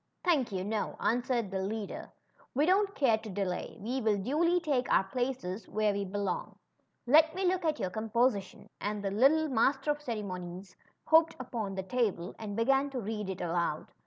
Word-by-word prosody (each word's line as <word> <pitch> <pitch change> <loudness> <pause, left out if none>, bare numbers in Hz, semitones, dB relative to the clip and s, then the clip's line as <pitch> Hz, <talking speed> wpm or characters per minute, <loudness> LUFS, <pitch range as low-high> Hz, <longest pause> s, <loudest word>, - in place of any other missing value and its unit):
Thank 295 - +2
you, 185 -2 -2
no," 210 +1 -2
answered 240 -3 0
the 190 - -1
leader. 205 +2 -4 0.3
^ - - -25
We 290 +3 +3
don't 390 +3 +2
care 235 -6 +3
to 220 0 -9
delay. 190 -2 -3
We 250 +5 -2
will 215 -2 +2
duly 315 - +2
take 280 -7 0
our - - +5
places 215 -3 -3
where 215 -1 +1
we 200 0 -2
belong. 195 -1 -3 0.5
Let 315 +6 +5
me 380 0 -1
look 365 0 +1
at 310 -3 0
your 185 - -2
composition," 220 -2 0
and 205 0 -2
the 195 - -1
lit 240 +7 +6
tle 315 0 +1
Master 270 +4 +2
of 295 0 -3
Ceremonies 185 -6 -5 0.3
hopped 320 +1 +5
upon 225 -6 -4
the 190 - -3
table 205 -5 -1
and 210 -2 -5
began 270 +5 +2
to 265 -2 -4
read 210 -2 -4
it 190 - -4
aloud. 170 -2 -1
225 Hz, 190 wpm, -31 LUFS, 195-275 Hz, 0.5 s, lit